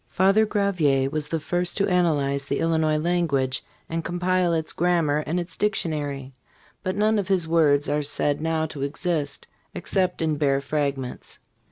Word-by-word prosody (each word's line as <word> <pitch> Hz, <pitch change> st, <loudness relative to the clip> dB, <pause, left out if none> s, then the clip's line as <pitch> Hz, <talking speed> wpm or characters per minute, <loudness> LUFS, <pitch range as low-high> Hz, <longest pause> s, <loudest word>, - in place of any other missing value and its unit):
Father 195 Hz, +4 st, +3 dB
Gravier 155 Hz, -11 st, +1 dB
was 150 Hz, -1 st, -2 dB
the 165 Hz, +1 st, -2 dB
first 175 Hz, +3 st, 0 dB
to 200 Hz, -, +2 dB
analyze 145 Hz, -7 st, +1 dB
the -, -, -1 dB
Illinois 160 Hz, -2 st, +1 dB
language 150 Hz, -6 st, 0 dB, 0.2 s
and 165 Hz, 0 st, -3 dB
compile 180 Hz, +1 st, +1 dB
its 160 Hz, -1 st, -1 dB
grammar 165 Hz, -4 st, +2 dB
and 175 Hz, +3 st, 0 dB
its 175 Hz, -1 st, -6 dB
dictionary, 145 Hz, -9 st, -2 dB, 0.5 s
but 185 Hz, 0 st, -2 dB
none 215 Hz, +1 st, +2 dB
of 195 Hz, -, -3 dB
his 185 Hz, -4 st, +1 dB
works 150 Hz, -3 st, +3 dB
are 150 Hz, +1 st, +1 dB
said 145 Hz, 0 st, 0 dB
now 160 Hz, 0 st, 0 dB
to 150 Hz, -3 st, -7 dB
exist 145 Hz, 0 st, -2 dB, 0.3 s
except 185 Hz, -3 st, 0 dB
in 155 Hz, -2 st, 0 dB
bare 140 Hz, -2 st, +2 dB
fragments. 140 Hz, -2 st, -3 dB
160 Hz, 160 wpm, -24 LUFS, 145-180 Hz, 0.5 s, Father